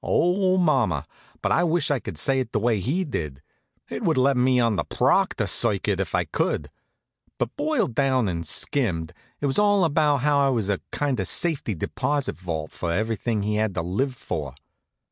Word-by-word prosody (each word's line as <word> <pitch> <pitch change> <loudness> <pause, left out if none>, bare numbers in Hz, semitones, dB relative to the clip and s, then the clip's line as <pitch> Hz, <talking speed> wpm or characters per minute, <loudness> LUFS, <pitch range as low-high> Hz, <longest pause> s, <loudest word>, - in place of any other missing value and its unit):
Oh, 185 +2 +2
mama! 130 - +2 0.4
but - - +1
I 175 - +3
wish 170 -2 +1
I 140 - +1
could 85 - -7
say 135 - +1
it 130 -4 -4
the - - +2
way 115 -1 +1
he 150 - 0
did! 75 - -4 0.5
It - - -5
would - - +2
let 135 +2 +3
me 125 0 +3
on 115 -3 +2
the - - 0
Proctor 190 - +1
circuit, - - +2
if - - -1
I - - +2
could. - - -2 0.7
But - - -2
boiled 295 - 0
down 130 -2 +2
and 85 -2 -2
skimmed, 85 - -1 0.3
it - - 0
was 135 +7 +1
all 205 -2 +4
about 150 -3 +2
how 145 +1 +3
I 140 -1 +3
was 115 -6 0
a 100 - 0
kind 140 -5 -1
of 95 - -1
safety 150 - -1
deposit 135 - -2
vault 80 -4 -5
for 85 - -3
everything 110 +2 -1
he 105 +1 0
had 110 -3 0
to - - -1
live 125 +10 -1
for. 75 - -5
125 Hz, 195 wpm, -24 LUFS, 100-145 Hz, 0.7 s, all